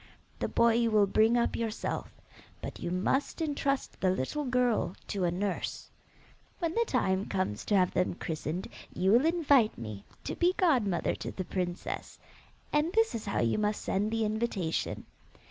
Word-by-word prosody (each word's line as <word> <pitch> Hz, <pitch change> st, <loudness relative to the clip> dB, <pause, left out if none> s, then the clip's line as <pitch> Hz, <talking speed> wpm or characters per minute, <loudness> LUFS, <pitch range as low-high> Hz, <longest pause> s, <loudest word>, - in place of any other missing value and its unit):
The -, -, 0 dB
boy 235 Hz, -1 st, +4 dB
you 230 Hz, 0 st, +2 dB
will 210 Hz, -2 st, +5 dB
bring 220 Hz, +4 st, +3 dB
up 235 Hz, -, +1 dB
yourself, 225 Hz, -2 st, -3 dB, 0.5 s
but -, -, -7 dB
you 175 Hz, -, -3 dB
must 185 Hz, -, 0 dB
entrust 280 Hz, -3 st, -1 dB
the 185 Hz, -, +3 dB
little 185 Hz, -, -1 dB
girl 245 Hz, -7 st, +1 dB
to 195 Hz, -3 st, 0 dB
a -, -, +3 dB
nurse. 195 Hz, +3 st, -3 dB, 0.7 s
When 335 Hz, -3 st, -1 dB
the 465 Hz, +4 st, +2 dB
time 190 Hz, -6 st, +1 dB
comes 185 Hz, -, -2 dB
to 210 Hz, -, +2 dB
have 180 Hz, -2 st, +4 dB
them 180 Hz, -1 st, +1 dB
christened 160 Hz, +1 st, -4 dB, 0.3 s
you 190 Hz, +2 st, +2 dB
will 245 Hz, +8 st, +5 dB
invite 285 Hz, -9 st, +3 dB
me 110 Hz, -3 st, -7 dB, 0.2 s
to -, -, -3 dB
be 360 Hz, +1 st, +2 dB
godmother 245 Hz, -, +2 dB
to -, -, -5 dB
the 185 Hz, -, -5 dB
princess, 175 Hz, -2 st, -4 dB, 0.6 s
and 300 Hz, +3 st, +2 dB
this 450 Hz, 0 st, +3 dB
is 225 Hz, -2 st, -5 dB
how 200 Hz, -, 0 dB
you 115 Hz, -, +1 dB
must 210 Hz, 0 st, 0 dB
send 205 Hz, +2 st, 0 dB
the 225 Hz, 0 st, 0 dB
invitation. 210 Hz, -6 st, -2 dB
215 Hz, 170 wpm, -30 LUFS, 185-255 Hz, 0.7 s, will